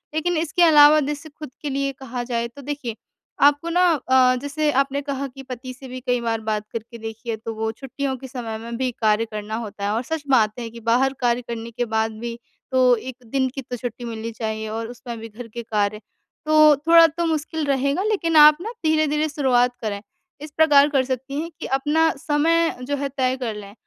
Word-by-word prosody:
लेकिन 340 +2 0
इसके 320 +2 -1
अलावा 305 -2 +7
जैसे 295 +2 -4
खुद 305 -1 -10
के 295 - -3
लिए 275 0 -1
कहा 250 -2 -5
जाए 235 -1 -2
तो 240 +4 -13
देखिए 275 -5 -5 0.5
आपको 290 +3 +3
ना 355 +2 +2
अ, 260 -3 +3
जैसे 295 +1 0
आपने 275 +1 +1
कहा 280 -1 -3
कि 270 +1 -12
पति 255 0 -7
से 265 +1 -12
भी 255 0 -7
कई 245 -1 +1
बार 225 -1 -1
बात 215 -1 -2
करके 230 +1 -6
देखी 225 +1 -8
है 225 - 0
तो 225 +1 -6
वो 220 0 -2
छुट्टियों 270 +3 -4
के 265 - -9
समय 240 -4 -5
में 230 +1 -7
भी 260 0 0
कार्य 215 +1 +3
करना 210 0 -5
होता 210 -3 -5
है 205 - 0
और 225 - 0
सच 320 +3 -4
बात 225 -3 +3
है 235 -1 -5
कि 235 +1 -11
बाहर 260 +4 +3
कार्य 245 -1 +1
करने 230 0 -6
के 245 +1 -2
बाद 220 0 0
भी 235 0 -5 0.3
तो 255 -1 +5
एक 250 +2 -7 0.2
दिन 265 -1 +2
की 270 - -3
तो 245 -1 -6
छुट्टी 245 0 -6
मिलनी 230 0 -5
चाहिए 220 -1 -4
और 225 +1 -4
उसमें 240 0 -8
भी 225 - -7
घर 230 +3 -10
के 235 +1 -7
कार्य, 210 -1 -1 0.5
तो 305 -1 +6
थोड़ा 335 0 +8
तो 335 +2 -3
मुश्किल 315 -1 -2
रहेगा 280 +5 0
लेकिन 390 -6 0
आप 300 0 +9
ना 440 +5 -5
धीरे-धीरे 310 -1 +2
शुरुआत 250 -4 +2
करें, 205 -3 -3 0.4
इस 300 0 -8
प्रकार 295 -3 +6
कर 275 -3 +2
सकती 265 +2 -4
हैं 335 - -5
कि - - -5
अपना 295 +4 +2
समय 325 +4 +1
जो 285 +3 -2
है 280 0 -2
तय 255 0 +1
कर 230 -3 -2
लें, 200 -1 -10
260 Hz, 220 wpm, -22 LUFS, 230-295 Hz, 0.5 s, आप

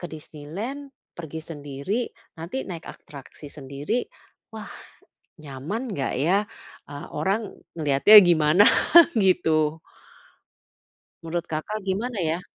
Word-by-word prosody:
ke 175 - -5
Disneyland, 185 - -8 0.3
pergi 160 -1 -7
sendiri, 145 - -4 0.3
nanti 170 +12 -5
naik 170 -3 -7
atraksi 145 +1 -13
sendiri, 145 - -3 0.5
wah, - - -8 0.7
nyaman 155 - -6
nggak 140 -8 -3
ya? 175 +8 +3 0.5
Eee, 145 0 -8
orang 195 +7 -2 0.2
ngelihatnya 150 +8 +6
gimana, 170 +3 +4 0.5
gitu. 160 -5 +2 1.4
Menurut 170 +1 -3
Kakak 185 +8 -4
gimana, 210 +4 -2
ya? 165 +1 -1
165 Hz, 100 wpm, -24 LUFS, 150-200 Hz, 1.4 s, ngelihatnya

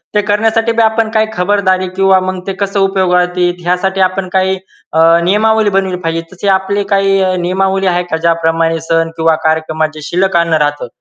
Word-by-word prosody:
ते 210 - +3
करण्यासाठी 225 +2 +1
बी 230 0 +1
आपण 220 0 +1
काही 220 0 +2
खबरदारी 185 0 0
किंवा 195 0 +3
मग 185 0 -3
ते 195 - -2
कसं 200 0 -1
उपयोगात 180 -2 +1
येईल, 175 0 +1
यासाठी 190 +2 0
आपण 185 0 0
काही 190 0 +1 0.4
अ, 160 - +1 0.2
नियमावली 215 +3 +2
बनवली 190 -2 -1
पाहिजे. 165 0 -1
तसे 185 +2 -5
आपले 200 +2 -2
काही 195 0 +2
अ, 185 -1 +1
नियमावली 190 +2 0
आहे 180 0 +1
का? 160 - 0
ज्याप्रमाणे 165 0 0
सण 165 0 +1
किंवा 160 0 +2
कार्यक्रमात 160 0 0
जे 155 - -10
शिल्लक 180 +3 0
अन्न 170 -1 +1
राहतं. 145 -3 -4
185 Hz, 185 wpm, -13 LUFS, 170-195 Hz, 0.4 s, ते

